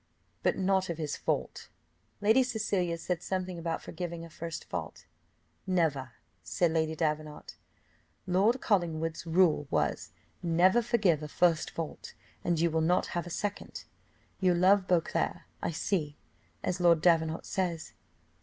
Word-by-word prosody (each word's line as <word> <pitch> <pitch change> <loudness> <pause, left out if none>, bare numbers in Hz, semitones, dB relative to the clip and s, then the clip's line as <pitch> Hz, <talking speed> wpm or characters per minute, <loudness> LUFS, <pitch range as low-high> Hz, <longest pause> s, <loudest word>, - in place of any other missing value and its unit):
"But - - +1
not 190 -1 +1
of 170 - -3
his 155 -3 -3
fault." - - -3 0.5
Lady 220 +5 +5
Cecilia 205 -8 -1
said 175 0 -3
something 185 -1 -3
about 165 0 -3
forgiving 170 -2 -5
a 165 - -13
first 165 0 -6
fault. 85 -3 -6 0.6
"Never!" 155 -8 0 0.3
said 175 -4 0
Lady 160 -1 0
Davenant. 155 -1 -3 0.7
"Lord 195 +7 +3
Collingwood's 165 -5 0
rule 165 -4 +3
was 75 -1 -1 0.3
never 180 +6 +4
forgive 210 - +2
a 150 - -5
first 165 +1 +2
fault, 165 -2 -6 0.3
and 170 -2 +1
you 170 0 +2
will 160 0 +1
not 175 +3 +2
have 175 0 -2
a - - -6
second. 205 +4 -4 0.6
You 185 -2 +3
love 190 +2 +4
Beauclerc, 175 -3 0 0.2
I - - -1
see, 160 -3 -2 0.5
as 180 - -1
Lord 170 -2 +5
Davenant 160 -2 +3
says." 175 -5 -2
170 Hz, 140 wpm, -30 LUFS, 160-185 Hz, 0.7 s, Lady